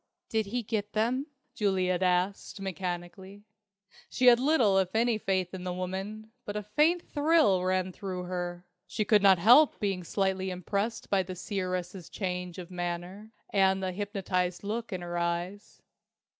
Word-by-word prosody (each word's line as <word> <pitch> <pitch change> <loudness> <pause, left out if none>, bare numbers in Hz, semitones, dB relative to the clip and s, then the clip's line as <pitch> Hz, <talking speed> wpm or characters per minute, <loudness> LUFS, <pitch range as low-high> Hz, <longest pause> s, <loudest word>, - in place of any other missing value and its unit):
"Did 220 -2 0
he 240 +4 -2
get 210 -1 -3
them?" 245 +6 0 0.3
Juliet 185 -3 0
asked, 185 +2 0
mechanically. 190 +1 -5 0.7
She 255 - 0
had 240 -1 +8
little 250 -9 +3
if 185 +1 -1
any 230 -1 +2
faith 190 -3 -1
in 185 -1 -6
the 180 - -3
woman, 190 +4 -5
but 205 - -6
a 210 - -2
faint 305 - +2
thrill 290 - +3
ran 185 0 0
through 185 -1 -5
her. 175 0 -4 0.2
She 210 +4 -2
could 210 -2 +4
not 195 -2 +6
help 245 - +6
being 195 -3 -1
slightly 190 +1 -1
impressed 200 +5 -3
by 195 -1 +4
the 185 0 -6
seeress's 185 -2 -4
change 180 -2 -4
of 180 -1 -8
manner, 175 +4 -5 0.2
and 190 -1 +3
the 185 - -1
hypnotized 185 -2 -2
look 225 +3 -3
in 185 -2 -3
her 175 0 -3
eyes. 175 +4 -4
190 Hz, 155 wpm, -29 LUFS, 180-210 Hz, 0.7 s, had